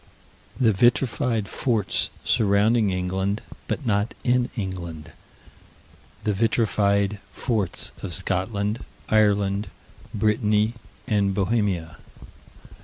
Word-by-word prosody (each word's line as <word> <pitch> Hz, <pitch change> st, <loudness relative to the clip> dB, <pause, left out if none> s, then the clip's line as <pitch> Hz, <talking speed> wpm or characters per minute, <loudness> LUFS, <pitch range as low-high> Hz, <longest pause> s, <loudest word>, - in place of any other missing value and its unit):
The 115 Hz, -4 st, +4 dB
vitrified 120 Hz, 0 st, +2 dB
forts 110 Hz, -4 st, 0 dB
surrounding 105 Hz, +1 st, +3 dB
England, 95 Hz, +3 st, -1 dB, 0.2 s
but 145 Hz, -, -3 dB
not 105 Hz, -1 st, 0 dB
in 125 Hz, 0 st, +2 dB
England. 85 Hz, -6 st, -5 dB, 1.1 s
The 105 Hz, -, +1 dB
vitrified 100 Hz, -2 st, +1 dB
forts 105 Hz, -5 st, -2 dB
of 95 Hz, -, -5 dB
Scotland, 100 Hz, +4 st, -1 dB, 0.3 s
Ireland, 105 Hz, -2 st, +2 dB, 0.4 s
Brittany, 105 Hz, +1 st, +2 dB, 0.3 s
and 100 Hz, -3 st, +1 dB
Bohemia. 95 Hz, -5 st, 0 dB
105 Hz, 85 wpm, -24 LUFS, 95-110 Hz, 1.1 s, The